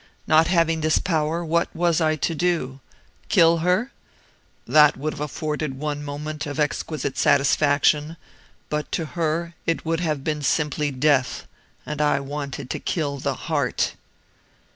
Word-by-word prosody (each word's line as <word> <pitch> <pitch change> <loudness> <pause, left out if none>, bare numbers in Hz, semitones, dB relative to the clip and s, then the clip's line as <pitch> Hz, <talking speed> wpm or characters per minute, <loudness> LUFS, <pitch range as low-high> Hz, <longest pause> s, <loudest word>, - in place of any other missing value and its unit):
Not 160 +1 +4
having 165 -2 +2
this 155 0 +2
power 165 0 0
what 170 +1 +1
was 170 0 +2
I 155 -1 +2
to 160 +2 -1
do? 155 -5 -1 0.5
Kill 170 -4 +5
her? 180 +10 +1 0.7
That 150 -1 +5
would 150 +3 -3
have - - -10
afforded 150 -1 -3
one 145 0 -3
moment 150 +2 -5
of 145 +1 -5
exquisite 150 -1 -2
satisfaction 145 +2 +3 0.5
but 150 0 -3
to 165 - -1
her 170 0 -1
it 165 0 -1
would 165 0 0
have 155 -5 -2
been 150 -1 -2
simply 150 +1 0
death 135 -1 +1 0.4
and 150 -1 -3
I 150 -2 +2
wanted 140 -1 -5
to - - -3
kill 145 -5 -2
the 135 0 -2
heart." 145 -5 -1
155 Hz, 145 wpm, -23 LUFS, 145-165 Hz, 0.7 s, Kill